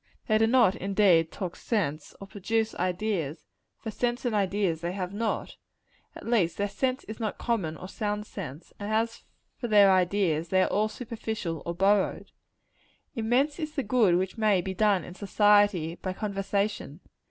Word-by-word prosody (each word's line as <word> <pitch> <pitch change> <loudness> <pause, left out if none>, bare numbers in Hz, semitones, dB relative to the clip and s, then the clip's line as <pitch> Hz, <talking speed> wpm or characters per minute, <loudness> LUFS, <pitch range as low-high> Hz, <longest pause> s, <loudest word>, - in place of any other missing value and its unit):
They 215 -1 +2
do 225 - +4
not, 235 -5 +5
indeed, 190 -4 +3
talk 180 -3 -5
sense, 155 -10 -2
or 195 - -8
produce 220 +3 -1
ideas; 180 -4 -2 0.3
for 220 - -6
sense 240 +3 -2
and 240 - 0
ideas 195 -4 0
they 175 +1 -3
have 185 -1 -4
not. 220 +2 -3 0.6
At - - -10
least, 210 -8 +1
their 205 - 0
sense 260 +4 -1
is 215 - -8
not 220 -2 -3
common 190 -10 -2
or 185 - -8
sound 210 +1 -3
sense: 165 -7 -8
and 205 +1 -4
as 225 +1 -1 0.3
for 240 - -4
their 205 -3 +6
ideas, 180 -3 +1
they 185 +1 +4
are - - -1
all 215 +1 +1
superficial 220 -8 -5
or 170 - -2
borrowed. 195 +2 +1 0.8
Immense 250 +7 +1
is 310 -2 -4
the 275 - 0
good 215 -6 +3
which 190 +5 -2
may 210 -3 +3
be 190 +2 -3
done 200 -1 +2
in - - -9
society, 205 -4 +3
by 185 +1 -5
conversation. 195 -5 -2
205 Hz, 170 wpm, -27 LUFS, 180-220 Hz, 0.8 s, their